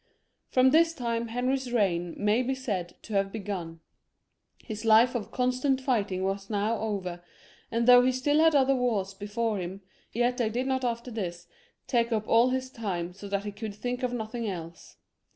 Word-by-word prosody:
From 260 Hz, 0 st, +4 dB
this 330 Hz, +2 st, +4 dB
time 235 Hz, -3 st, -2 dB
Henry's 250 Hz, +2 st, -1 dB
reign 175 Hz, -7 st, 0 dB
may 210 Hz, +4 st, +2 dB
be 260 Hz, +1 st, -1 dB
said 195 Hz, -10 st, -4 dB
to 220 Hz, -, -8 dB
have 195 Hz, 0 st, +1 dB
be 225 Hz, -, -5 dB
gun; 175 Hz, -6 st, -5 dB, 0.8 s
his 215 Hz, -2 st, -6 dB
life 225 Hz, +2 st, +5 dB
of 235 Hz, -5 st, -3 dB
constant 255 Hz, +1 st, +1 dB
fighting 210 Hz, -8 st, 0 dB
was 195 Hz, +1 st, -2 dB
now 210 Hz, +1 st, 0 dB
over, 190 Hz, -5 st, -3 dB, 0.5 s
and 230 Hz, 0 st, 0 dB
though 245 Hz, 0 st, +9 dB
he 255 Hz, +1 st, +3 dB
still 290 Hz, +4 st, +1 dB
had 320 Hz, -1 st, +5 dB
other 270 Hz, -1 st, +4 dB
wars 225 Hz, -7 st, 0 dB
before 210 Hz, +2 st, -2 dB
him, 185 Hz, +2 st, -6 dB, 0.3 s
yet 245 Hz, +2 st, +1 dB
they 235 Hz, -4 st, +1 dB
did 245 Hz, +4 st, -2 dB
not 260 Hz, -1 st, 0 dB
after 235 Hz, 0 st, -2 dB
this 175 Hz, -6 st, -5 dB, 0.4 s
take 235 Hz, -1 st, +1 dB
up 215 Hz, -1 st, -1 dB
all 235 Hz, +2 st, +5 dB
his 260 Hz, 0 st, -2 dB
time 180 Hz, -7 st, -4 dB
so 195 Hz, +2 st, -9 dB
that 200 Hz, 0 st, -1 dB
he 205 Hz, -, -3 dB
could 205 Hz, 0 st, -6 dB
think 245 Hz, +4 st, -3 dB
of 250 Hz, -1 st, 0 dB
nothing 230 Hz, -1 st, -3 dB
else. 170 Hz, -3 st, -8 dB
230 Hz, 190 wpm, -28 LUFS, 200-250 Hz, 0.8 s, though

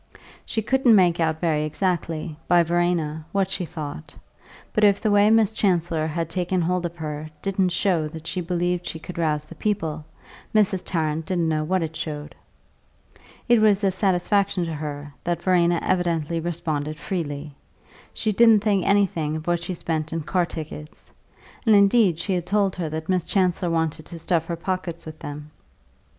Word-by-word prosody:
She 220 Hz, -, -1 dB
couldn't 255 Hz, -1 st, +4 dB
make 175 Hz, -3 st, +4 dB
out 160 Hz, -1 st, +1 dB
very 155 Hz, -3 st, +1 dB
exactly, 165 Hz, -1 st, -2 dB
by 175 Hz, -1 st, +5 dB
Verena, 170 Hz, -2 st, 0 dB
what 195 Hz, -1 st, +1 dB
she 180 Hz, -, -3 dB
thought; 150 Hz, -, -7 dB, 0.6 s
but 215 Hz, -, +1 dB
if 200 Hz, -1 st, +5 dB
the 215 Hz, -, +1 dB
way 205 Hz, +1 st, +5 dB
Miss 220 Hz, -1 st, +4 dB
Chancellor 170 Hz, -6 st, +1 dB
had 165 Hz, +1 st, -2 dB
taken 180 Hz, +2 st, -1 dB
hold 175 Hz, +1 st, 0 dB
of 170 Hz, -, -12 dB
her 155 Hz, -1 st, -5 dB
didn't 190 Hz, -1 st, +1 dB
show 175 Hz, -3 st, +1 dB
that 160 Hz, +1 st, -9 dB
she 180 Hz, -, -3 dB
believed 175 Hz, 0 st, -1 dB
she -, -, -4 dB
could 170 Hz, +2 st, -8 dB
rouse 150 Hz, -2 st, 0 dB
the 170 Hz, -, -11 dB
people, 160 Hz, -4 st, -2 dB, 0.5 s
Mrs. 195 Hz, -3 st, +3 dB
Tarrant 160 Hz, -2 st, -2 dB
didn't 175 Hz, -3 st, 0 dB
know 155 Hz, -1 st, 0 dB
what 185 Hz, +2 st, 0 dB
it 160 Hz, 0 st, -5 dB
showed. 150 Hz, -1 st, -5 dB, 1.1 s
It 240 Hz, -2 st, +5 dB
was 210 Hz, -1 st, +4 dB
a 195 Hz, -, +3 dB
satisfaction 190 Hz, 0 st, +1 dB
to 165 Hz, -, -4 dB
her 145 Hz, -1 st, -6 dB
that 175 Hz, -1 st, -2 dB
Verena 175 Hz, -2 st, +3 dB
evidently 170 Hz, -3 st, 0 dB
responded 155 Hz, -3 st, -3 dB
freely; 150 Hz, -3 st, -4 dB, 0.6 s
she 215 Hz, -, -1 dB
didn't 225 Hz, 0 st, +6 dB
think 200 Hz, -4 st, +2 dB
anything 170 Hz, -7 st, +2 dB
of 155 Hz, 0 st, -5 dB
what 175 Hz, -1 st, 0 dB
she 180 Hz, +1 st, -3 dB
spent 160 Hz, -2 st, -3 dB
in 165 Hz, 0 st, -2 dB
car 175 Hz, +3 st, 0 dB
tickets, 155 Hz, -1 st, -9 dB, 0.5 s
and 220 Hz, -3 st, +5 dB
indeed 200 Hz, -3 st, +5 dB
she 190 Hz, +3 st, -2 dB
had 175 Hz, -1 st, -2 dB
told 200 Hz, 0 st, +1 dB
her 170 Hz, -3 st, -2 dB
that 160 Hz, +1 st, -5 dB
Miss 185 Hz, -2 st, +1 dB
Chancellor 180 Hz, -2 st, +1 dB
wanted 160 Hz, -2 st, -1 dB
to 170 Hz, -, -8 dB
stuff 165 Hz, 0 st, 0 dB
her 170 Hz, -, -2 dB
pockets 170 Hz, -1 st, -4 dB
with 155 Hz, 0 st, -9 dB
them. 150 Hz, 0 st, -8 dB
170 Hz, 175 wpm, -24 LUFS, 155-190 Hz, 1.1 s, didn't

